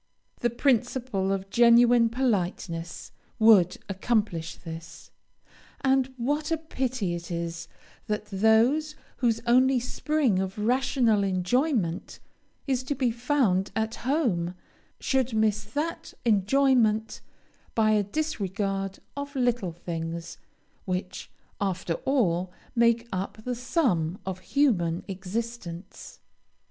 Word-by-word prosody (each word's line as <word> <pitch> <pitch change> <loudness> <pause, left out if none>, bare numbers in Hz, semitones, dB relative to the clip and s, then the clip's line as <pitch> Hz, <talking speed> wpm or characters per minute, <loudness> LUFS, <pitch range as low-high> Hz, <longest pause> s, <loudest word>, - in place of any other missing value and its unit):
The 240 - +1
principle 245 -5 0
of 195 0 -3
genuine 235 0 +6
politeness 185 -8 -2 0.3
would 210 -6 +5
accomplish 195 -4 -1
this; 165 0 -10 0.7
and 265 -1 +2
what 290 +5 -1
a 325 - +1
pity 255 - -2
it 170 0 -6
is 170 -1 -4 0.4
that 210 -1 -2
those 225 +10 +3 0.2
whose 230 -3 +1
only 255 +2 +4
spring 255 -3 0
of 190 +1 -3
rational 230 -1 +2
enjoyment 190 - 0 0.5
is 265 -3 0
to 285 - -1
be 255 -3 +1
found 235 -6 +1
at 220 0 -1
home, 225 - 0 0.4
should 260 -3 0
miss 215 -1 +2
that 295 +10 -4
enjoyment 225 0 +2 0.5
by 220 -1 +3
a 210 -1 +4
disregard 195 - -2 0.2
of 285 0 -6
little 245 -7 +1
things, 165 0 -6 0.5
which, 185 0 -4 0.3
after 185 -3 -1
all, 185 -10 +1 0.2
make 235 0 +3
up 190 +3 -3
the 250 - -2
sum 230 - 0
of 190 -1 -4
human 185 - +1
existence! 195 -1 -6
220 Hz, 110 wpm, -27 LUFS, 185-255 Hz, 0.7 s, genuine